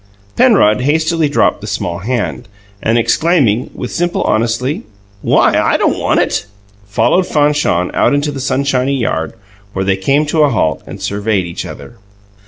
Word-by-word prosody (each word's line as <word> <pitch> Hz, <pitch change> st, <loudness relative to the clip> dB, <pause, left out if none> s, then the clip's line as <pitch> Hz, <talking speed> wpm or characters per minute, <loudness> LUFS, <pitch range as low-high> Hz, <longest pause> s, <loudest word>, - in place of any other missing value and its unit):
Penrod 125 Hz, -, +4 dB
hastily 160 Hz, +2 st, +1 dB
dropped 145 Hz, -, +1 dB
the -, -, -7 dB
small 85 Hz, -1 st, -3 dB
hand, 120 Hz, +1 st, -3 dB, 0.3 s
and 115 Hz, +1 st, +1 dB
exclaiming, 130 Hz, -, +2 dB
with 125 Hz, -, -5 dB
simple 175 Hz, 0 st, -1 dB
honesty, 115 Hz, +5 st, 0 dB, 0.4 s
"Why, -, -, +3 dB
I -, -, +2 dB
don't -, -, 0 dB
want -, -, +1 dB
it!" -, -, -1 dB, 0.4 s
followed 175 Hz, -, +1 dB
Fanchon 145 Hz, -, +1 dB
out -, -, +2 dB
into 145 Hz, +1 st, -1 dB
the 140 Hz, -, -6 dB
sunshiny 135 Hz, 0 st, 0 dB
yard, 80 Hz, -10 st, -2 dB, 0.4 s
where 95 Hz, 0 st, -2 dB
they 95 Hz, 0 st, +1 dB
came 140 Hz, +10 st, +1 dB
to 155 Hz, +1 st, 0 dB
a 150 Hz, -, +4 dB
halt 80 Hz, -, 0 dB
and -, -, -8 dB
surveyed 100 Hz, -2 st, -1 dB
each 85 Hz, -, -6 dB
other. 120 Hz, -2 st, -11 dB
125 Hz, 160 wpm, -15 LUFS, 105-150 Hz, 0.4 s, Penrod